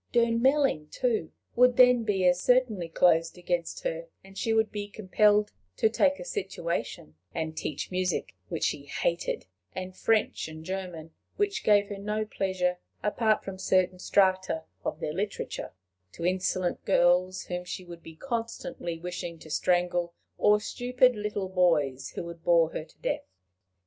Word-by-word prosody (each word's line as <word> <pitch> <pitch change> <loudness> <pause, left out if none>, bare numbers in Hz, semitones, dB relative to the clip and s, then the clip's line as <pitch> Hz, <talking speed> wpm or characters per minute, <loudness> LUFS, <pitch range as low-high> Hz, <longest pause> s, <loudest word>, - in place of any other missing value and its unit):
Durnmelling, 235 - +3
too, 225 -8 -1 0.2
would 250 0 +5
then 250 -2 +6
be 195 -4 +1
as 180 0 +4
certainly 230 -9 +2
closed 165 0 +3
against 175 -1 -2
her, - - -3 0.2
and 195 0 -15
she 225 - -1
would 220 -1 +2
be 205 -1 -4
compelled 210 0 +2 0.3
to 220 - +4
take 280 +5 +2
a - - -8
situation, 170 - -4 0.2
and 160 -1 -3
teach 150 +1 -4
music, 185 0 -1 0.2
which - - -3
she - - -1
hated, - - -1 0.3
and 185 0 -5
French 220 -5 +1
and 160 0 -10
German, 180 -4 -5 0.2
which 405 -1 0
gave 205 -1 +4
her 200 -1 -5
no 210 +2 -2
pleasure 185 -3 -1 0.2
apart 215 +1 +2
from 190 -1 -7
certain 185 -1 +2
strata 185 -4 +2 0.2
of - - -3
their 150 - -2
literature, 200 +4 -4 0.4
to 170 - -5
insolent 185 0 0
girls 185 0 +3
whom 180 0 -4
she 180 +1 -6
would 170 -1 -10
be 160 -1 -12
constantly 230 -7 -4
wishing 175 0 -5
to 155 -1 -12
strangle, 175 0 +1 0.2
or 210 0 +5
stupid 250 +3 +2
little 210 -2 -3
boys 150 -8 +2
who - - -3
would 170 -1 -9
bore 170 -2 +4
her - - -4
to - - -24
death. - - -2
185 Hz, 155 wpm, -28 LUFS, 175-220 Hz, 0.4 s, then